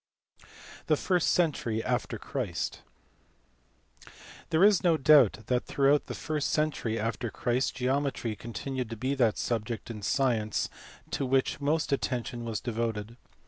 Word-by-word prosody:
The 155 - +3
first 180 0 +1
century 120 -10 +1
after - - -1
Christ. - - -4 1.7
There 160 +3 +3
is 205 -2 +5
no 170 -3 +4
doubt 135 -7 +5
that 125 +1 0
throughout 140 +1 +3
the - - -5
first 155 -2 -2
century 150 -7 0
after 115 +2 -2
Christ 125 +4 -1
geometry 130 -3 -1
continued 125 +2 -5
to 115 - -6
be 130 +4 -1
that 120 -6 +2
subject 115 0 -3
in 105 -2 -7
science 115 -3 0 0.4
to - - -1
which 135 +2 +1
most 155 +2 0
attention 120 -3 -2
was 115 -2 -2
devoted. 115 -2 -3
130 Hz, 135 wpm, -29 LUFS, 115-145 Hz, 1.7 s, is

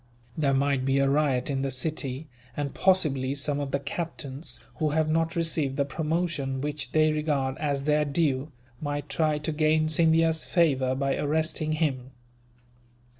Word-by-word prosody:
There 140 -3 +1
might 140 -1 +1
be 135 +1 +1
a 140 0 +3
riot 140 -3 +1
in 135 -1 -1
the 135 - -1
city 135 +1 -3 0.3
and, 145 -1 -2
possibly, 140 -8 +2
some 145 0 -1
of 140 -1 -3
the 140 - 0
captains, 140 -1 -5 0.2
who 155 -2 +1
have 155 +1 +1
not 165 +1 0
received 160 -5 0
the 140 - +2
promotion 155 -2 -2
which 145 -2 -3
they 155 0 +4
regard 145 -4 0
as 140 -2 -1
their 150 +1 +2
due, 145 -1 0 0.3
might 145 -1 -3
try 155 -2 +1
to 150 +2 -3
gain 155 0 +2
Scindia's 160 0 +3
favour 135 -7 +2
by 135 0 0
arresting 155 +1 0
him." 135 -5 -1
150 Hz, 160 wpm, -27 LUFS, 135-155 Hz, 0.3 s, they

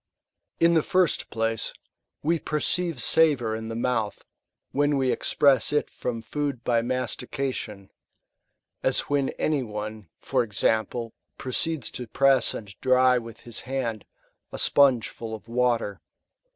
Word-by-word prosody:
In 170 0 +5
the 160 - +4
first 180 +1 +1
place, 115 0 -1 0.5
we 165 +2 +2
perceive 160 +1 -1
savour 135 -9 +3
in 110 0 -5
the 115 - -5
mouth, 115 -3 -1 0.5
when 145 0 +2
we 130 -2 +2
express 135 -5 +3
it 150 - 0
from 115 -2 -4
food 140 +1 -3
by 115 -1 +2
mastication; 125 -4 -3 0.9
as - - +1
when 140 -2 0
any 150 -3 +1
one, 105 -4 -6
for - - 0
example, 115 +1 0 0.2
proceeds 145 +2 -2
to 125 - -6
press 135 +1 +3
and 100 -3 -8
dry 130 -1 +4
with 115 -1 -11
his 120 -2 -6
hand 125 -5 -3 0.5
a - - -6
sponge 130 -6 +4
full 110 -1 -6
of 110 - -13
water. 120 -3 0
125 Hz, 135 wpm, -26 LUFS, 115-140 Hz, 0.9 s, In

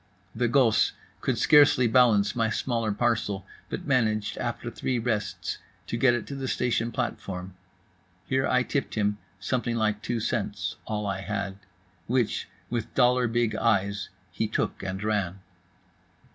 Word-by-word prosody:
The 120 +1 +1
gosse 120 -2 +4 0.3
could - - 0
scarcely 145 -4 +6
balance 115 -4 +4
my 115 -2 +2
smaller 115 -1 -1
parcel, 105 -3 0 0.2
but 180 - -4
managed 110 -7 +1
after 120 0 -3
three 125 +1 -1
rests 110 -5 -2 0.3
to - - -3
get 120 +1 +4
it 120 - -3
to 140 - -6
the 135 -1 -4
station 120 -2 0
platform; 95 -6 -4 0.7
here 130 +3 +1
I 125 0 +3
tipped 140 +2 -2
him 105 -1 +1 0.2
something 120 +4 -1
like 105 -2 0
two 120 +1 -2
cents - - -2
(all 105 -1 -2
I 95 -1 -2
had) 100 -1 -3 0.5
which, 120 -2 0 0.2
with 115 0 -3
dollar 125 -1 +4
big 115 -1 +1
eyes, 100 -3 +1 0.2
he 110 +5 -1
took 105 - -2
and 95 +2 -4
ran. 100 -4 0
115 Hz, 145 wpm, -27 LUFS, 105-125 Hz, 0.7 s, scarcely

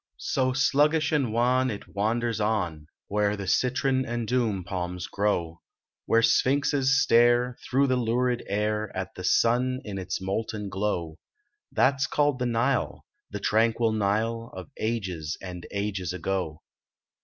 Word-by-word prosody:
So 130 -1 0
sluggish 145 +4 +2
and 140 -7 +1
wan 125 +3 +2
it 105 -4 -6
wanders 115 +2 -1
on 90 -8 -1 0.2
Where 105 0 0
the 100 - -5
citron 130 +5 +1
and 120 -2 -3
dhouni 110 -7 0
palms 90 -1 -4
grow. 85 -5 -1 0.5
Where 115 0 +4
Sphinxes 135 +1 +3
stare, 120 0 +4
through 135 +2 +2
the 130 -2 +1
lurid 125 +1 0
air, 105 +1 -1
At 95 - -4
the 90 - -8
sun 125 +6 +2
in 100 -2 -5
its 95 0 -3
molten 105 +2 -3
glow; 95 -5 -2 0.5
That 130 - +3
s 135 0 -1
called 145 -3 +1
the 125 - 0
Nile, 120 +3 0 0.2
the - - -5
tranquil 115 +1 +2
Nile 110 +3 -1
Of - - -9
ages 95 -9 -2
and 90 -2 -8
ages 100 -4 -2
ago. 90 -4 -3
110 Hz, 145 wpm, -26 LUFS, 95-125 Hz, 0.5 s, Where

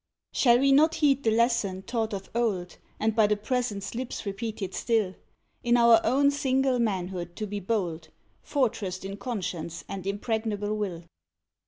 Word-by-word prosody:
Shall 240 -2 +5
we 275 +2 +3
not 310 +4 +5
heed 280 -3 +3
the 230 - +2
lesson 220 -4 +1
taught 225 0 -2
of 195 -2 -6
old, 200 -7 -1 0.2
And 220 0 +1
by 220 -2 +5
the 210 0 +1
Present's 210 -3 -2
lips 245 -1 -5
repeated 200 -1 -4
still, 220 -5 +1 0.5
In 240 0 +4
our 235 -1 +6
own 280 +4 +3
single 265 -2 +1
manhood 180 -5 -2
to 215 - -3
be 205 0 -4
bold, 175 -6 -2 0.3
Fortressed 205 -9 -1
in 195 +1 -5
conscience 180 -7 -4
and 195 -1 -6
impregnable 210 0 -1
will? 190 -5 -3
215 Hz, 155 wpm, -27 LUFS, 195-240 Hz, 0.5 s, our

